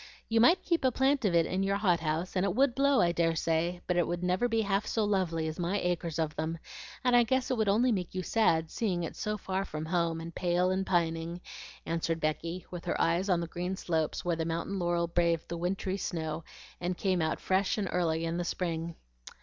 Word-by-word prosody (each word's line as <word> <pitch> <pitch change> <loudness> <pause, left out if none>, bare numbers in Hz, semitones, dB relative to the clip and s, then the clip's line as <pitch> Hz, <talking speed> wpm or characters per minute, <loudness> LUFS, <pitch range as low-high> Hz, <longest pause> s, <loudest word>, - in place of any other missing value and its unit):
You 225 0 +3
might 335 +10 +5
keep 335 -4 0
a 260 - +4
plant 265 0 +2
of 180 -4 +2
it 165 -1 +4
in 185 +1 -1
your 195 0 +1
hot 180 -5 +2
house, 160 +4 -2
and 185 - +2
it 195 -1 0
would 270 0 +3
blow 275 +1 +3
I 170 - +3
dare 165 -1 +1
say; 165 +2 0
but 180 - 0
it 175 - +2
would 175 +1 -3
never 180 +6 +2
be 225 -1 +2
half 200 0 0
so 220 - 0
lovely 175 -6 0
as 155 +2 -5
my 180 +4 0
acres 170 -3 -1
of 160 -2 -1
them, 160 +1 -2 0.5
and 250 -1 +4
I 240 - +7
guess 260 +2 +1
it 255 - +1
would 215 -2 +2
only 235 +5 +3
make 185 -4 -2
you 185 - -2
sad, 165 -7 +2
seeing 185 -7 -1
it 165 - -5
so 210 0 -2
far 190 -1 -2
from 155 -4 -5
home, 165 -1 0
and 165 +1 -7
pale 180 +1 +1
and 190 +1 -1
pining," 165 -1 0 0.5
answered 165 0 -1
Becky, 165 +3 -2
with 175 -2 -7
her - - -1
eyes 175 +4 +2
on 175 -2 +3
the 170 - -3
green 180 +3 -3
slopes 160 -3 -1
where 175 -1 +1
the 165 - -2
mountain 170 +4 -2
laurel 175 -1 +1
braved 170 -1 +1
the 170 - -3
wintry 190 +3 -2
snow, 160 -4 -3 0.3
and 180 0 -2
came 185 -3 +1
out 160 - 0
fresh 190 +2 +1
and 205 -3 -1
early 165 -2 0
in 165 +1 -2
the 175 - -1
spring. 170 -2 -3
175 Hz, 235 wpm, -30 LUFS, 165-195 Hz, 0.5 s, I